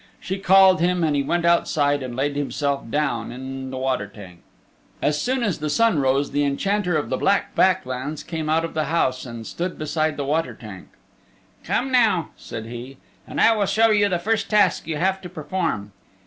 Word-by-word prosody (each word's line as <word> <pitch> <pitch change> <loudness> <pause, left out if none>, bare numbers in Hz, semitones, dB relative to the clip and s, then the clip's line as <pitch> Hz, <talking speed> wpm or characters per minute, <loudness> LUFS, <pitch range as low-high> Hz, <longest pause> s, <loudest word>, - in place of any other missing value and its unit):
She 190 +1 -4
called 190 -1 +6
him 180 0 +2
and 155 -2 +1
he 140 - +2
went 170 +5 -1
outside 145 -4 +2
and 125 -2 -5
laid 140 +2 -1
himself 140 -2 -2
down 130 -5 -1
in 130 +1 -6
the 130 - -6
water 130 -5 -1
tank. 95 -4 -13 0.6
As 150 0 0
soon 260 0 0
as 205 -8 -1
the 150 0 -2
sun 225 +1 +3
rose 135 +1 +1
the 145 - +1
Enchanter 180 +5 0
of 150 - -3
the - - -1
Black 200 0 +1
Back 190 -7 +3
Lands 130 +4 -5
came 160 -2 -4
out 165 +1 +2
of 165 - -7
the 155 -1 0
house 130 -5 0
and 115 -2 -8
stood 175 +7 -4
beside 155 0 -1
the 140 - -2
water 160 +4 -1
tank. 105 -5 -11 0.8
"Come 265 +2 -1
now," 225 -9 +3
said 110 - -8
he, 120 +3 -8 0.3
"and - - -5
I 225 - +5
will 205 -2 0
show 220 +3 +3
you 205 -1 +3
the 180 - +1
first 220 +5 -1
task 205 -6 +2
you 160 -2 -2
have 190 +4 0
to 180 - -8
perform." 170 - -3
155 Hz, 205 wpm, -23 LUFS, 135-185 Hz, 0.8 s, called